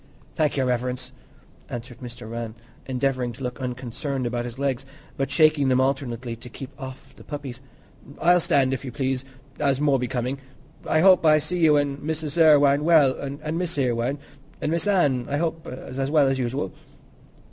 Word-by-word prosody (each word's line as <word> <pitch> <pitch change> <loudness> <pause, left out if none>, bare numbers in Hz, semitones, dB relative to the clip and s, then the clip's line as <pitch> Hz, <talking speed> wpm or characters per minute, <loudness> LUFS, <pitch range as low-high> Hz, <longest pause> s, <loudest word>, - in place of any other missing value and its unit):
"Thank 150 -2 +1
Your 135 - +2
Reverence," 125 +1 -2 0.6
answered 120 0 -7
Mr. 120 -2 -9
Rann, 115 -1 -5 0.3
endeavouring 130 -2 -1
to 135 +3 -10
look 125 +1 -4
unconcerned 125 +2 -3
about 120 0 -2
his 120 0 -7
legs, 135 -2 -1 0.3
but 135 - -1
shaking 155 -3 +4
them 130 0 +3
alternately 130 -3 -1
to 125 +2 -11
keep 130 +3 -9
off 135 0 -9
the - - -14
puppies; 140 -4 -7 0.6
"I'll 175 +2 +5
stand, 135 -5 +2
if 130 - -3
you 130 - -5
please, 130 0 -1 0.4
as 140 -2 +2
more 145 -2 +3
becoming. 125 +2 -2 0.5
I 155 - +3
hope 185 -1 +6
I 155 -1 +6
see 175 +4 -2
you 155 -3 +5
an' 145 -1 0
Mrs. 155 +1 -2
Irwine 145 -2 +6
well, 155 -5 +6 0.3
an' 155 +2 -2
Miss 175 -3 -2
Irwine—an' 135 +4 -3
Miss 170 +4 0
Anne, 145 -11 +2
I 145 - 0
hope's 165 0 -2
as 135 +1 -4
well 150 -2 +4
as 135 0 0
usual." 125 -5 -2
135 Hz, 170 wpm, -24 LUFS, 125-150 Hz, 0.6 s, hope